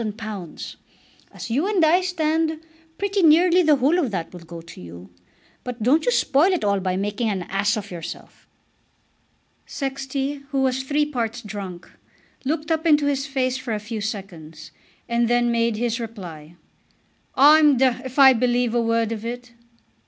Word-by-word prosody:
As -, -, -8 dB
you 290 Hz, +11 st, +1 dB
and 390 Hz, -6 st, +3 dB
I 345 Hz, +4 st, +4 dB
stand, 320 Hz, -3 st, 0 dB, 0.4 s
pretty 400 Hz, 0 st, 0 dB
nearly 345 Hz, +3 st, +5 dB
the 310 Hz, -3 st, +4 dB
whole 285 Hz, +7 st, +2 dB
of 285 Hz, -8 st, 0 dB
that 180 Hz, -5 st, -5 dB
will 180 Hz, -, -9 dB
go 170 Hz, 0 st, -10 dB
to 165 Hz, -, -12 dB
you. 85 Hz, +1 st, -11 dB, 0.5 s
But 245 Hz, -3 st, -6 dB
don't 295 Hz, -, +3 dB
you -, -, +4 dB
spoil 325 Hz, -, +3 dB
it 360 Hz, -, -1 dB
all 200 Hz, -1 st, +1 dB
by 185 Hz, -1 st, -2 dB
making 205 Hz, +3 st, -1 dB
an 190 Hz, -3 st, -2 dB
ass 195 Hz, +4 st, 0 dB
of 205 Hz, -2 st, -7 dB
yourself." 170 Hz, -2 st, -9 dB, 1.2 s
Sexty, 275 Hz, +1 st, -4 dB
who 275 Hz, -2 st, 0 dB
was 260 Hz, 0 st, 0 dB
three 290 Hz, +3 st, 0 dB
parts 240 Hz, -5 st, -3 dB
drunk, 195 Hz, -4 st, -7 dB, 0.6 s
looked 305 Hz, +3 st, -2 dB
up 320 Hz, +1 st, 0 dB
into 295 Hz, -2 st, +4 dB
his 280 Hz, -1 st, -1 dB
face 260 Hz, -2 st, -1 dB
for 245 Hz, -4 st, -3 dB
a -, -, -3 dB
few 215 Hz, +1 st, -6 dB
seconds, 175 Hz, -7 st, -7 dB, 0.4 s
and 235 Hz, 0 st, +1 dB
then 240 Hz, 0 st, +2 dB
made 230 Hz, -1 st, +1 dB
his 235 Hz, +1 st, -1 dB
reply. 175 Hz, -9 st, -8 dB, 0.8 s
"I'm 295 Hz, 0 st, +6 dB
d 265 Hz, +2 st, +4 dB
d 235 Hz, -, -7 dB
if 260 Hz, +1 st, -8 dB
I 270 Hz, -2 st, +8 dB
believe 245 Hz, -1 st, +1 dB
a 240 Hz, -, +2 dB
word 230 Hz, -1 st, 0 dB
of 220 Hz, -1 st, -5 dB
it." 245 Hz, +1 st, -6 dB
245 Hz, 170 wpm, -22 LUFS, 210-295 Hz, 1.2 s, I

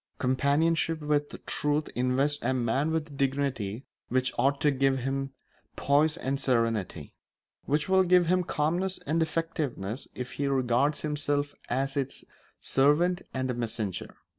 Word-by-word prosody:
Companionship 155 Hz, +5 st, +1 dB
with 150 Hz, -1 st, -1 dB
truth 150 Hz, +1 st, 0 dB
invests 130 Hz, +4 st, +1 dB
a 130 Hz, +2 st, +1 dB
man 130 Hz, +5 st, +1 dB
with 160 Hz, -1 st, -1 dB
a -, -, -15 dB
dignity 135 Hz, -5 st, -1 dB, 0.2 s
which 130 Hz, +1 st, +1 dB
ought 140 Hz, +1 st, +2 dB
to 150 Hz, -, +4 dB
give 135 Hz, 0 st, +2 dB
him 135 Hz, +1 st, -2 dB, 0.4 s
poise 150 Hz, +3 st, +2 dB
and 135 Hz, -2 st, -2 dB
serenity; 115 Hz, -, -1 dB, 0.5 s
which 150 Hz, +1 st, 0 dB
will 190 Hz, 0 st, +5 dB
give 180 Hz, -1 st, +4 dB
him 180 Hz, +2 st, +2 dB
calmness 175 Hz, +5 st, 0 dB
and 160 Hz, +3 st, +1 dB
effectiveness 150 Hz, -9 st, -2 dB
if 125 Hz, 0 st, -5 dB
he 140 Hz, -, -2 dB
regards 135 Hz, +2 st, +1 dB
himself 145 Hz, -1 st, -1 dB, 0.2 s
as 135 Hz, +3 st, -1 dB
its 135 Hz, -2 st, -3 dB, 0.3 s
servant 165 Hz, +7 st, +2 dB
and 130 Hz, -1 st, -2 dB
messenger. 110 Hz, -5 st, -4 dB
140 Hz, 140 wpm, -28 LUFS, 130-150 Hz, 0.5 s, will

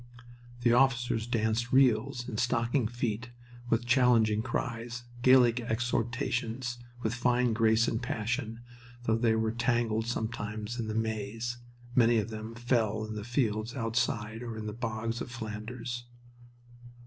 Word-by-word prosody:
The 120 Hz, -1 st, +4 dB
officers 125 Hz, -3 st, +2 dB
danced 115 Hz, 0 st, 0 dB
reels 125 Hz, -1 st, +3 dB
in 110 Hz, -, -4 dB
stocking 115 Hz, +1 st, +1 dB
feet 120 Hz, 0 st, -3 dB, 0.4 s
with 115 Hz, +1 st, +2 dB
challenging 120 Hz, -4 st, +4 dB
cries, 120 Hz, 0 st, -3 dB, 0.2 s
Gaelic 125 Hz, -2 st, +6 dB
exhortations, 120 Hz, +1 st, -1 dB, 0.2 s
with 110 Hz, -, 0 dB
fine 125 Hz, -1 st, +2 dB
grace 110 Hz, 0 st, +3 dB
and 115 Hz, -, -1 dB
passion, 115 Hz, 0 st, -2 dB, 0.4 s
though 110 Hz, -2 st, +2 dB
they 115 Hz, -1 st, +2 dB
were 110 Hz, 0 st, +1 dB
tangled 115 Hz, -1 st, 0 dB
sometimes 110 Hz, 0 st, -3 dB
in 115 Hz, -, -2 dB
the 110 Hz, -, -3 dB
maze... 115 Hz, +2 st, -2 dB, 0.4 s
many 120 Hz, -2 st, +5 dB
of 110 Hz, +1 st, -1 dB
them 110 Hz, +1 st, -6 dB
fell 115 Hz, -3 st, +1 dB
in 110 Hz, -, -6 dB
the 105 Hz, -1 st, -5 dB
fields 115 Hz, -1 st, -1 dB
outside 115 Hz, -2 st, -1 dB
or 115 Hz, -2 st, -5 dB
in 110 Hz, -, -5 dB
the 105 Hz, -, -4 dB
bogs 115 Hz, 0 st, -3 dB
of -, -, -5 dB
Flanders. 120 Hz, +1 st, -5 dB
115 Hz, 135 wpm, -30 LUFS, 110-120 Hz, 0.4 s, Gaelic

